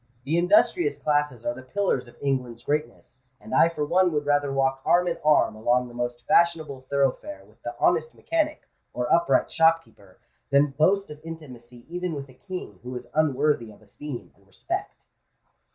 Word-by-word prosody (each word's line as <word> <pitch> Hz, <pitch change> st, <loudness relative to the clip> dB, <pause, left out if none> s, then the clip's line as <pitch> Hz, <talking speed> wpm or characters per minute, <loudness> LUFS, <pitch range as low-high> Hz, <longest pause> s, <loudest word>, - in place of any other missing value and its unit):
The 155 Hz, +6 st, +1 dB
industrious 280 Hz, -, +3 dB
classes 145 Hz, -5 st, 0 dB
are 120 Hz, -, 0 dB
the 130 Hz, -, -10 dB
pillars 135 Hz, -2 st, -1 dB
of 120 Hz, -, -17 dB
England's 125 Hz, -4 st, -2 dB
greatness; 150 Hz, -2 st, -3 dB, 0.2 s
and -, -, -10 dB
I 165 Hz, +5 st, +5 dB
for 150 Hz, -3 st, -3 dB
one 180 Hz, +3 st, +3 dB
would 145 Hz, -1 st, -1 dB
rather 145 Hz, -1 st, +2 dB
walk 135 Hz, -1 st, 0 dB
arm 180 Hz, +1 st, +3 dB
in 170 Hz, -, -2 dB
arm 150 Hz, 0 st, +4 dB
along 120 Hz, +3 st, +1 dB
the -, -, -13 dB
most 120 Hz, 0 st, -4 dB
fashionable 155 Hz, -6 st, +2 dB
thoroughfare 140 Hz, -, -1 dB
with -, -, -25 dB
the -, -, -6 dB
honest 475 Hz, -, +2 dB
mechanic 315 Hz, -2 st, -2 dB, 0.3 s
or 125 Hz, 0 st, 0 dB
upright 170 Hz, 0 st, +3 dB
shopkeeper, 160 Hz, -, +1 dB, 0.3 s
than 140 Hz, +1 st, +4 dB
boast 185 Hz, +6 st, +2 dB
of 150 Hz, 0 st, -10 dB
intimacy 125 Hz, -7 st, -11 dB
even 175 Hz, 0 st, -3 dB
with 140 Hz, -1 st, -7 dB
a -, -, -15 dB
King 180 Hz, -, -8 dB
who 125 Hz, +1 st, -7 dB
is 125 Hz, -, -8 dB
unworthy 150 Hz, -5 st, +1 dB
of 105 Hz, -, -15 dB
esteem 120 Hz, +5 st, -8 dB
and 100 Hz, 0 st, -28 dB
respect." 95 Hz, -, -5 dB
145 Hz, 175 wpm, -25 LUFS, 125-165 Hz, 0.3 s, I